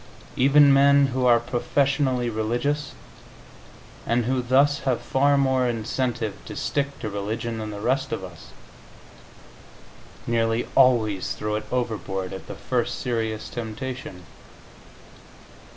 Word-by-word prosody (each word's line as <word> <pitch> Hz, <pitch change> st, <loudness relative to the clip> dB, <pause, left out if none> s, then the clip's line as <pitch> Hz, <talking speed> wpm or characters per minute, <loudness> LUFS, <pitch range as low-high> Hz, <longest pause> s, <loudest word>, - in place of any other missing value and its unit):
Even 140 Hz, +2 st, +6 dB
men 140 Hz, +1 st, +5 dB
who 130 Hz, -1 st, +1 dB
are 120 Hz, -1 st, +6 dB
professionally 130 Hz, +1 st, 0 dB
religious, 120 Hz, +6 st, -2 dB, 1.1 s
and 120 Hz, 0 st, 0 dB
who 130 Hz, +1 st, 0 dB
thus 135 Hz, +4 st, +3 dB
have 130 Hz, -3 st, 0 dB
far 140 Hz, +1 st, +2 dB
more 130 Hz, -2 st, +2 dB
incentive 120 Hz, -1 st, -2 dB
to -, -, -8 dB
stick 140 Hz, 0 st, -2 dB
to 115 Hz, -, -4 dB
religion 110 Hz, +3 st, -4 dB
than 110 Hz, -1 st, -5 dB
the 105 Hz, -1 st, -6 dB
rest 135 Hz, +5 st, -1 dB
of -, -, -3 dB
us, 90 Hz, -3 st, -11 dB, 1.8 s
nearly 115 Hz, 0 st, 0 dB
always 110 Hz, -8 st, +3 dB
throw 105 Hz, 0 st, -3 dB
it 105 Hz, 0 st, -4 dB
overboard 105 Hz, -7 st, -3 dB
at 95 Hz, -, -8 dB
the -, -, -7 dB
first -, -, -2 dB
serious 110 Hz, -3 st, -2 dB
temptation. 120 Hz, -4 st, -6 dB
120 Hz, 120 wpm, -24 LUFS, 110-135 Hz, 1.8 s, Even